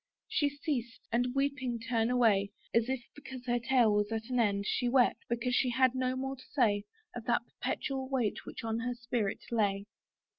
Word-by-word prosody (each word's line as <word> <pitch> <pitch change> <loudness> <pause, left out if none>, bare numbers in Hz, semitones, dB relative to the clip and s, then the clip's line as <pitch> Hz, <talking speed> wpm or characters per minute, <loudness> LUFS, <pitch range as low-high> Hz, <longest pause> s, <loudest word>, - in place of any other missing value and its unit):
She 290 - +2
ceased, 280 -5 -4
and 245 +2 +1
weeping 270 -3 0
turned 230 0 0
away, 220 -5 +3 0.2
As 230 +1 +3
if 260 -2 -1
because 265 -3 -9
her 240 -1 +1
tale 235 -2 +4
was 205 +1 +1
at 225 +2 -3
an 250 - +1
end 200 -3 +2
She 245 +4 +1
wept; 250 -1 +3
because 240 +1 0
she 250 +1 +3
had 255 0 +3
no 255 0 0
more 265 +1 -3
to 255 - -14
say 210 -6 +3 0.3
Of 240 -2 -6
that 235 -1 +2
perpetual 265 +1 -3
weight 250 -6 0
which - - -8
on 225 0 -1
her 245 +1 -2
spirit 235 -4 -2
lay. 200 -3 +1
245 Hz, 190 wpm, -32 LUFS, 225-260 Hz, 0.3 s, tale